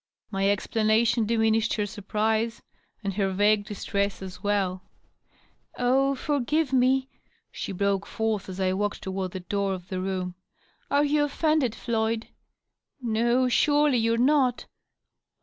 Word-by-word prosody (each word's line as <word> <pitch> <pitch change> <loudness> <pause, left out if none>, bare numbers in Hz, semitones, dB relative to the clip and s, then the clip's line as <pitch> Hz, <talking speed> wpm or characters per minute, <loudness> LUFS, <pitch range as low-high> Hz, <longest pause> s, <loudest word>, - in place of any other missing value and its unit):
My 195 0 +1
explanation 220 +2 +2
diminished 225 0 +2
her 210 - 0
surprise, 215 +2 -1 0.4
and 200 -1 -2
her 195 0 0
vague 205 +2 +3
distress 200 -1 -2
as 185 -1 -9
well. 195 -3 0 0.5
" - - -35 0.2
Oh, 270 +3 +2
forgive 290 +1 0
me 260 +1 +3 0.2
!" - - -39
she - - -5
broke 200 +1 0
forth, 220 -3 -2
as 185 0 -7
I 185 -1 +1
walked 205 +1 -2
toward 190 -1 -3
the 185 - -5
door 200 +1 -1
of 180 0 -11
the 185 -2 -3
room. 185 -1 -3 0.6
"Are 285 +1 +3
you 295 0 +2
offended, 290 -5 +1
Floyd? 225 -1 -1 0.7
No, 240 +1 +1
surely 290 +1 +3
you're 230 +1 +1
not 255 -1 +2
220 Hz, 140 wpm, -26 LUFS, 195-250 Hz, 0.7 s, vague